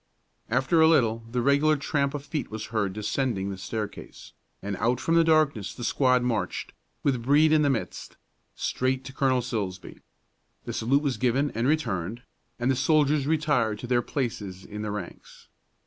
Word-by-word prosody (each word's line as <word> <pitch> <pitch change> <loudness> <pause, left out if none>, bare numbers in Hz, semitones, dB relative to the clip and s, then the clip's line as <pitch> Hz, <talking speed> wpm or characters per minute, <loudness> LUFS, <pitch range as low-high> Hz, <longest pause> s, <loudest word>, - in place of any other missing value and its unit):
After 130 +7 +2
a 160 - +7
little 115 -8 +3
the 120 0 -1
regular 145 +3 +3
tramp 140 0 -1
of 145 -1 -6
feet 150 -1 -4
was 110 0 -5
heard 100 -4 0
descending 105 -1 -2
the 95 - -6
staircase, 105 +2 -6 0.3
and 100 0 -4
out 120 +3 +1
from 165 +5 0
the 165 0 +6
darkness 155 -10 +2
the 120 - -7
squad 125 0 +2
marched, 120 -3 -2 0.3
with 130 -4 +1
Brede 145 +5 +4
in 155 -1 +5
the 145 - +3
midst, 130 -5 -4 0.4
straight 130 +1 -1
to 130 - -8
Colonel 130 -2 +1
Silsbee. 100 -6 -5 0.6
The - - -4
salute 135 +6 +1
was 135 -6 -1
given 130 +4 +1
and 115 +3 -1
returned, 115 - -1 0.4
and 120 +2 +2
the - - +1
soldiers 145 +1 +2
retired 145 -9 +1
to 120 - -7
their 120 0 +2
places 105 -8 -4
in 105 0 -7
the 105 - -3
ranks. 100 -4 -8
125 Hz, 175 wpm, -26 LUFS, 110-145 Hz, 0.6 s, a